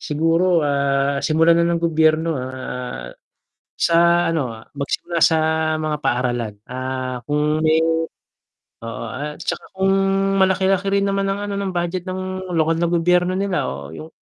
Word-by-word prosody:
Siguro, 165 +2 +2
ah, 140 -1 +1
simulan 165 +3 +3
na 170 - +3
ng 170 -1 0
gobyerno, 160 -1 +2
ah, 125 - -6 0.7
sa 170 +1 +4
ano 135 -9 -2 0.2
magsimula 160 +4 -2
sa 160 - +5 0.4
mga 155 -1 -1
paaralan, 120 -4 -1
ah, 130 -1 -4
kung 150 +1 +1
may 160 0 +4 1.0
oo 115 0 -6
at 145 +5 -6
tsaka - - -3
kung 190 0 +1 0.5
malaki-laki 190 +1 +2
rin 200 0 +2
naman 195 0 0
ng 195 +1 -2
ano 200 - -3
ng 195 -1 -2
budget 175 0 -2
ng 185 0 -4
lokal 160 0 +2
na 170 - +1
gobyerno 175 +1 +2
nila 195 -1 -1
o 70 +1 -8
yung 80 0 -9
160 Hz, 145 wpm, -21 LUFS, 135-175 Hz, 1.0 s, sa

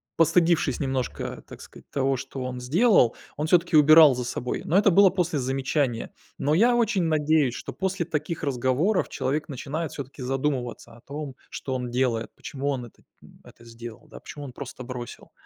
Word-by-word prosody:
постыдившись 165 -4 +3
немножко, 130 -3 -3
так - - -11
сказать, - - -15
того, 135 -1 +1
что 135 0 -6
он 125 0 -5
сделал, 150 - +4 0.2
он 150 +2 -1
всё-таки 170 0 +3
убирал 155 -1 +8
за 125 - -3
собой. 125 0 -3
Но 175 - +2
это 205 0 +5
было 195 +2 +7
после 175 -4 -1
замечания. 130 -1 -1 0.3
Но 145 - 0
я 235 +9 +4
очень 220 -6 +1
надеюсь, 155 -5 +2
что - - -7
после 190 -2 -2
таких 160 0 -3
разговоров 140 - +1
человек 150 +4 -2
начинает 145 +3 -4
всё-таки 140 0 -8
задумываться 130 -2 -3
о 115 - -17
том, 145 -1 -7
что 130 - -5
он 125 -1 -3
делает, 120 -3 0
почему 140 +1 -4
он 130 -3 -2
это, 120 - -18 0.2
м, - - -18
это 115 - -17
сделал, 115 -1 -10
да, - - -12
почему 145 -1 -9
он 130 - -9
просто 130 -1 -8
бросил, 120 -1 -8
140 Hz, 180 wpm, -25 LUFS, 125-165 Hz, 0.3 s, убирал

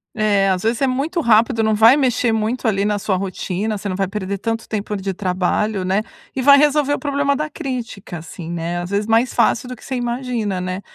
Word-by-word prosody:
É, 205 -3 +2
às 185 -1 0
vezes 225 +1 0
é 270 - +4
muito 285 +7 -1
rápido. 225 -1 +3
Não 220 0 +2
vai 225 +6 +6
mexer 250 -3 +1
muito, 225 +3 -1
ali, 200 -2 +1
na 210 -1 0
sua 195 -1 0
rotina, 195 +2 -3
você 200 +1 -5
não 185 - -2
vai 195 0 0
perder 200 0 -4
tanto 225 +2 -3
tempo, 210 -1 -3
ali, 200 - -3
de 195 0 -2
trabalho, 185 +2 -1
né, 190 +3 +1 0.3
e 265 - -1
vai 280 +2 +7
resolver 295 0 +3
o - - -1
problema 280 -1 0
da 305 +2 -3
crítica, 245 - -6
assim, 165 +1 -9
né, 170 +1 -3
às 175 - -6
vezes 200 +1 0
mais 230 +2 +2
fácil 245 - +2
do 250 - -6
que - - -18
você 265 - -4
imagina, 240 -6 -2
né? 185 +1 -4
220 Hz, 230 wpm, -20 LUFS, 195-250 Hz, 0.3 s, vai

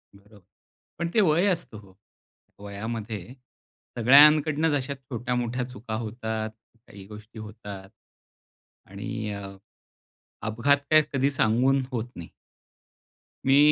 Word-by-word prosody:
बरोबर. 100 +1 -19 0.6
पण 170 0 -1
ते 220 - +4
वय 170 +1 +3
असतं 170 - -2
हो. 100 -2 -18 0.7
वयामध्ये 105 +1 -6 0.6
सगळ्यांकडून 150 +5 +6
अशा 140 0 -2
छोट्या-मोठ्या 125 -1 -3
चुका 120 -2 -8
होतात, 110 -1 -4 0.4
काही 100 -2 -12
गोष्टी 105 +1 -12
होतात. 105 -3 -9 1.0
आणि 105 +3 -5
अ, 100 -1 -8 0.9
अपघात 120 +6 +3
काय 155 0 +7
कधी 135 0 +2
सांगून 130 +2 +2
होत 120 -1 -3
नाही. 85 -1 -9 1.2
मी 135 +1 +5
115 Hz, 105 wpm, -26 LUFS, 105-135 Hz, 1.2 s, काय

